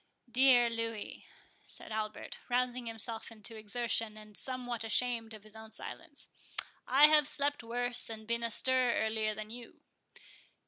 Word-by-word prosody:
"Dear 250 Hz, -1 st, +6 dB
Louis," 230 Hz, -2 st, -4 dB, 0.4 s
said -, -, -4 dB
Albert, 215 Hz, 0 st, -4 dB
rousing 250 Hz, 0 st, 0 dB
himself 225 Hz, 0 st, -2 dB
into 225 Hz, 0 st, -3 dB
exertion, 220 Hz, 0 st, 0 dB
and 215 Hz, -1 st, -13 dB
somewhat 245 Hz, -2 st, -2 dB
ashamed 225 Hz, 0 st, +1 dB
of 210 Hz, -, -13 dB
his 215 Hz, 0 st, -4 dB
own 220 Hz, 0 st, -10 dB
silence, -, -, -4 dB, 0.6 s
"I 275 Hz, +4 st, +7 dB
have 300 Hz, -1 st, +6 dB
slept 290 Hz, 0 st, 0 dB
worse, 245 Hz, +1 st, -1 dB
and 220 Hz, -1 st, -7 dB
been 235 Hz, +1 st, 0 dB
astir 250 Hz, +2 st, +3 dB
earlier 220 Hz, -1 st, 0 dB
than 215 Hz, 0 st, -7 dB
you." 240 Hz, 0 st, -10 dB
230 Hz, 140 wpm, -33 LUFS, 220-245 Hz, 0.6 s, I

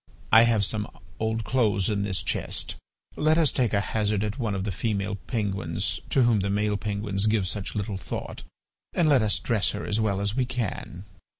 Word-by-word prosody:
I 110 Hz, +3 st, +8 dB
have 110 Hz, -3 st, +3 dB
some 105 Hz, +1 st, -2 dB, 0.3 s
old 110 Hz, 0 st, -1 dB
clothes 105 Hz, -6 st, +1 dB
in 105 Hz, -2 st, 0 dB
this 100 Hz, -2 st, 0 dB
chest. -, -, -1 dB, 0.4 s
Let 155 Hz, +1 st, +3 dB
us 160 Hz, -4 st, +4 dB
take 120 Hz, -5 st, +1 dB
at 100 Hz, -, +2 dB
hazard 105 Hz, +1 st, 0 dB
one 110 Hz, -6 st, -1 dB
of 95 Hz, -, -2 dB
these 100 Hz, -1 st, -2 dB
female 105 Hz, 0 st, -1 dB
penguins 100 Hz, -8 st, -1 dB
to 135 Hz, -, +3 dB
whom 120 Hz, -3 st, +4 dB
the 100 Hz, +1 st, -1 dB
male 105 Hz, +1 st, +1 dB
penguins 100 Hz, 0 st, -1 dB
give 105 Hz, -3 st, +2 dB
such 100 Hz, +1 st, -2 dB
little 100 Hz, -1 st, -2 dB
thought, 95 Hz, -, -6 dB, 0.5 s
and 170 Hz, -, +2 dB
let 140 Hz, -5 st, +5 dB
us 105 Hz, -1 st, +2 dB
dress 115 Hz, -4 st, +1 dB
her 105 Hz, -, -5 dB
as 105 Hz, +1 st, 0 dB
well 100 Hz, -3 st, +1 dB
as 100 Hz, +1 st, -1 dB
we 130 Hz, -2 st, +1 dB
can. 105 Hz, -6 st, -4 dB
105 Hz, 195 wpm, -26 LUFS, 100-115 Hz, 0.5 s, I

